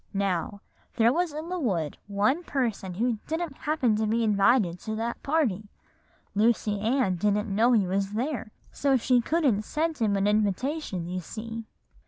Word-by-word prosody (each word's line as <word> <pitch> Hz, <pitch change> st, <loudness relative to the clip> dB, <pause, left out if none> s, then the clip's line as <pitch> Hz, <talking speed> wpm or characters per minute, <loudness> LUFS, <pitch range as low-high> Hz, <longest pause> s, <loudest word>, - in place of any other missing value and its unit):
"Now, 195 Hz, 0 st, -1 dB, 0.3 s
there 235 Hz, 0 st, +4 dB
was 350 Hz, +1 st, 0 dB
in 310 Hz, +3 st, -6 dB
the 365 Hz, 0 st, -2 dB
wood 175 Hz, -, -1 dB
one 210 Hz, +11 st, +1 dB
person 225 Hz, -, -2 dB
who 230 Hz, +2 st, 0 dB
didn't 320 Hz, -2 st, -3 dB
happen 280 Hz, -8 st, +1 dB
to 220 Hz, 0 st, 0 dB
be 230 Hz, +2 st, +1 dB
invited 205 Hz, -3 st, +3 dB
to 220 Hz, -, -4 dB
that 230 Hz, +2 st, -3 dB
party. 235 Hz, -, 0 dB, 0.6 s
Lucy 210 Hz, -1 st, +2 dB
Ann 220 Hz, -3 st, +1 dB
didn't 210 Hz, +2 st, 0 dB
know 235 Hz, +4 st, +4 dB
he 210 Hz, -5 st, +4 dB
was 195 Hz, +2 st, -1 dB
there, 245 Hz, 0 st, -2 dB, 0.2 s
so 275 Hz, -2 st, +2 dB
she 250 Hz, 0 st, +3 dB
couldn't 275 Hz, -7 st, +1 dB
send 315 Hz, +7 st, -2 dB
him 215 Hz, -3 st, +2 dB
an 195 Hz, 0 st, +1 dB
invitation 210 Hz, -, 0 dB
you 180 Hz, +1 st, -3 dB
see. 225 Hz, +5 st, -7 dB
225 Hz, 165 wpm, -27 LUFS, 200-265 Hz, 0.6 s, there